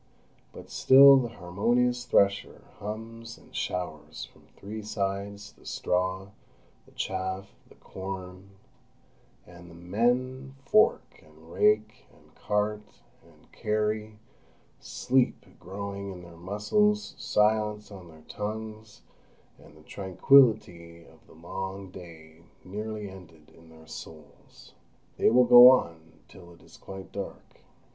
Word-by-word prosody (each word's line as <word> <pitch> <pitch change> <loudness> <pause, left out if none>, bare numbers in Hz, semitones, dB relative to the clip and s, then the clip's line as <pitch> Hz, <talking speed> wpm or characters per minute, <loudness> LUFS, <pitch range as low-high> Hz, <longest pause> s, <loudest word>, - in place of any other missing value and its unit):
But - - -13
still 135 +1 +8
the 125 -2 0
harmonious 120 +7 -1
thresher 100 0 +1 0.2
hums 115 +2 -8
and - - -19
showers 75 -8 -5
from - - -23
three 105 +2 -7
sides 100 -1 -4
the - - -23
straw, 95 +2 -2 0.6
the - - -20
chaff, 95 +1 -4 0.2
the - - -18
corn; 95 0 -8 1.0
and 85 0 -14
the 85 - -14
men 125 +9 -1
fork, 215 +9 +2
and - - -19
rake, 425 0 +1
and - - -24
cart, 105 0 -1 0.4
and - - -24
carry, 105 0 -2 0.6
sleep 130 0 0
growing 100 +2 -6
in 90 -2 -10
their 85 -1 -13
muscles, 105 - 0
silence 105 0 0
on 95 -3 -11
their 80 -1 -17
tongues, 110 0 -7 0.6
and 75 - -18
the 75 - -18
tranquillity 95 - +2
of - - -21
the - - -18
long 95 +3 -7
day 80 -3 -13 0.2
nearly 105 +2 -6
ended 85 -5 -14
in 80 0 -19
their 80 0 -16
souls. 75 +1 -13 0.4
They - - +4
will 125 +2 +5
go 120 +1 +10
on 80 -10 0
till 85 -2 -15
it - - -22
is - - -17
quite 95 0 -10
dark. 100 - -8
100 Hz, 120 wpm, -27 LUFS, 90-110 Hz, 1.0 s, go